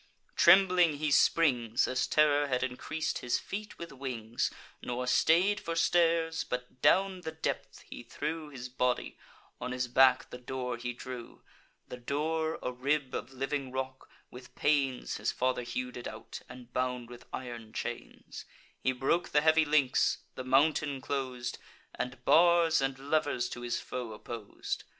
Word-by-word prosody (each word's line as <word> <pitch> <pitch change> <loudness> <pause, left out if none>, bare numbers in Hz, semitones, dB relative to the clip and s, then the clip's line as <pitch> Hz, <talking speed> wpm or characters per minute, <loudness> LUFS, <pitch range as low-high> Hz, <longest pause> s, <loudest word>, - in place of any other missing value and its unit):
Trembling 180 -3 +6
he 150 +1 -1
springs, 125 -7 +3
As 130 0 0
terror 145 -1 +3
had 125 -2 0
increas'd 155 +5 -3
his 120 - 0
feet 210 +1 -6
with 170 - -8
wings; 120 -4 -3 0.3
Nor 125 +1 -3
stay'd 170 +10 +4
for 165 -3 -4
stairs; 165 -1 +2
but 125 0 -6
down 190 -1 +3
the 160 - -5
depth 160 - -4
he - - -8
threw 155 +6 -4
His 130 -3 -7
body, 125 0 -1 0.4
on 125 - -4
his 125 0 -1
back 130 +1 +4
the 125 - -7
door 125 -1 -4
he 120 +1 -4
drew 120 0 -9 0.4
(The 125 - -7
door, 155 +5 -1
a - - -1
rib 135 +2 -1
of 130 - -4
living 135 0 -3
rock; 130 0 -5 0.2
with 125 0 -12
pains 140 -4 +1
His - - -1
father 130 0 0
hew'd 125 +1 -4
it 120 - -6
out, - - -8
and 125 -1 -12
bound 125 -1 -1
with 120 - -12
iron 120 -3 -6
chains): 120 +1 -6 0.3
He 130 - +1
broke 135 +7 0
the 150 - +3
heavy 160 0 +5
links, 145 -4 +2
the 130 - -6
mountain 140 +1 +2
clos'd, 130 -2 -3 0.3
And 125 0 -5
bars 170 -2 +5
and 135 0 -1
levers 145 -2 0
to 120 - -7
his 120 0 -2
foe 120 -3 -5
oppos'd. 115 -3 -6
130 Hz, 155 wpm, -31 LUFS, 125-155 Hz, 0.4 s, Trembling